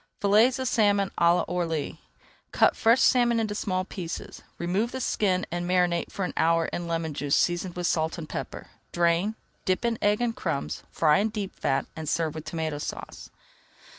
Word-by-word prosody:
FILLETS 220 +6 +4
OF 260 0 -2
SALMON 205 -4 +2
À 170 +1 +4
L'ORLY 165 -4 -2 0.5
Cut - - +4
fresh 230 +3 +4
salmon 240 -2 +4
into 215 -2 -1
small 185 -3 -1
pieces, 180 -4 -7 0.2
remove 190 +7 -1
the 260 - -4
skin, 190 -6 0
and 175 0 -2
marinate 180 -2 +1
for 195 - -2
an - - -5
hour 165 0 +3
in 175 -1 -3
lemon 165 -2 -2
juice 140 0 0
seasoned 175 0 0
with 175 0 -3
salt 160 0 0
and 160 -2 -6
pepper. - - -6 0.2
Drain, 175 +5 +1 0.3
dip 185 +5 0
in 230 -1 0
egg 205 0 +2
and 240 -1 -1
crumbs, 165 -6 -3
fry 155 +2 +3
in 215 +2 +1
deep 205 -3 -5
fat, 135 0 0
and 160 -2 -4
serve 160 -2 0
with 155 -1 -7
Tomato 160 -3 -3
Sauce. - - -7
180 Hz, 180 wpm, -26 LUFS, 165-210 Hz, 0.5 s, FILLETS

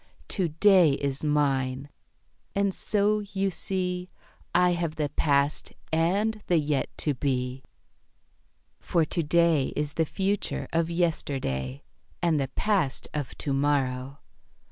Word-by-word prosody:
"To 185 -4 0
day 175 -1 +5
is 140 0 -2
mine. 135 -3 +1 0.7
And 200 -1 +1
so, 210 +2 +1
you 195 -1 -2
see, 180 -1 -3 0.5
I 180 0 +5
have 170 -2 -1
the 150 -2 -1
past 140 0 +1 0.2
and 200 +7 +1
the 175 - +3
yet 145 -3 0 0.2
to 150 - +2
be; 125 -1 -2 1.2
"For 165 -2 +1
to 170 - -1
day 165 -3 +3
is 150 -1 -2
the 160 - +1
future 195 +4 -1
of 165 0 +1
yesterday, 135 - -1 0.4
And 165 -3 +2
the 135 - 0
past 195 -11 0
of 145 -4 -4
to 140 - -2
morrow. 135 -1 0
155 Hz, 125 wpm, -27 LUFS, 140-180 Hz, 1.2 s, day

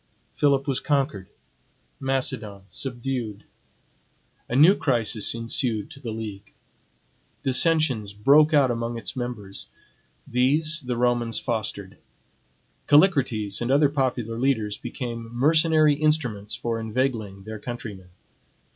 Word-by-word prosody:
Philip 140 -1 +2
was 135 -2 0
conquered; 135 -10 -1 0.7
Macedon 125 -7 -2
subdued. 120 -5 -4 1.1
A 120 - -2
new 155 +8 +7
crisis 115 - 0
ensued 115 -1 -1
to 140 - -11
the 125 -5 -6
league. 110 -3 -7 0.9
Dissensions 135 -6 +2
broke 140 +9 +4
out 140 -5 +4
among 115 0 -3
it 115 - -5
members. 120 -6 -6 0.6
These 150 +6 +2
the 125 -2 -1
Romans 120 -1 0
fostered. 105 -5 -4 0.9
Callicrates 130 - +3
and 120 - -2
other 140 +2 +4
popular 125 -5 -2
leaders 110 -6 0
became 115 -2 -6
mercenary 155 +2 +4
instruments 140 -9 0
for 115 -1 -3
inveigling 110 -4 -2
their 110 +1 -7
countrymen. 105 -6 -8
120 Hz, 110 wpm, -24 LUFS, 110-140 Hz, 1.1 s, new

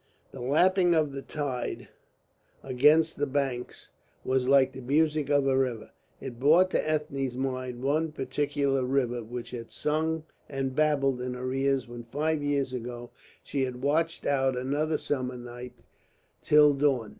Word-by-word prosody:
The 130 - -9
lapping 175 +7 +3
of 155 -3 +2
the 135 0 -6
tide 135 -4 -4 0.8
against 150 +5 +3
the 145 - 0
banks 135 -3 -3 0.3
was 130 -1 +1
like 135 -1 +5
the 130 - -8
music 150 +2 +1
of 145 -1 +3
a 135 -1 +2
river. 125 -4 -1 0.3
It 125 -3 -8
brought 165 +7 +5
to - - +1
Ethne's 140 -5 -2
mind 130 -2 -3
one 155 +3 +1
particular 140 -1 -1
river 125 -2 0
which 120 +2 -7
had 115 -2 -7
sung 160 +1 -1 0.3
and 135 -2 -3
babbled 140 -4 +2
in 125 0 -3
her 130 +1 -4
ears 135 -1 0
when 120 0 -8
five 150 +5 -1
years 140 -2 -1
ago 120 -1 -6 0.3
she 140 - -3
had 125 -1 -3
watched 165 +4 0
out 135 -2 +1
another 145 +5 0
summer 130 -3 -3
night 120 0 -10 0.6
till 150 -1 +6
dawn. 135 -6 +1
135 Hz, 155 wpm, -28 LUFS, 125-150 Hz, 0.8 s, till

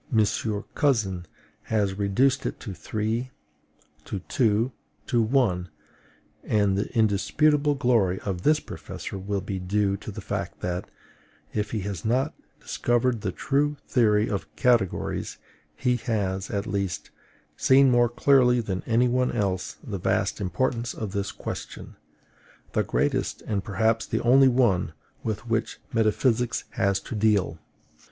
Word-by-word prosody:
Cousin 100 - +1 0.4
has 105 -3 +1
reduced 105 +8 +1
it - - -5
to 105 - -6
three, 110 +6 -2 0.7
to - - -4
two, 115 +3 +1 0.3
to 120 -2 +2
one; 110 -7 +1 0.7
and 100 -3 +2
the 100 - -2
indisputable 140 +8 +3
glory 115 -9 +2
of 95 -3 -3
this 150 +6 +4
professor 100 - -7
will 100 +1 -2
be 95 0 -4
due 100 +2 +1
to 105 - -9
the 105 +1 -7
fact - - -4
that, 90 0 -3 0.6
if 105 -1 -1
he 110 - -2
has 95 -4 -4
not 125 +4 +1 0.3
discovered 120 -1 0
the - - -1
true 145 +1 0
theory 110 -4 +3
of 100 -3 -3
categories, 120 -7 +1 0.4
he 125 -1 +1
has, 100 -5 -2
at 100 -1 -2
least, 95 -5 -3 0.4
seen 135 0 +5
more 120 -1 +4
clearly 125 0 +4
than 95 -5 -2
any 120 +2 +3
one 125 +1 +1
else 100 -5 -2
the - - -5
vast - - 0
importance 115 +5 -1
of 110 -3 -4
this 100 -1 -2
question, - - -7 0.8
the - - +1
greatest - - -1
and 100 -3 -2
perhaps 110 +3 +1
the - - -1
only 135 +3 +6
one 115 -11 +2 0.3
with 110 +1 -4
which 115 0 -1 0.2
metaphysics 115 +2 +1
has 100 0 +1
to - - -8
deal. 105 -6 +1
110 Hz, 135 wpm, -26 LUFS, 100-125 Hz, 0.8 s, only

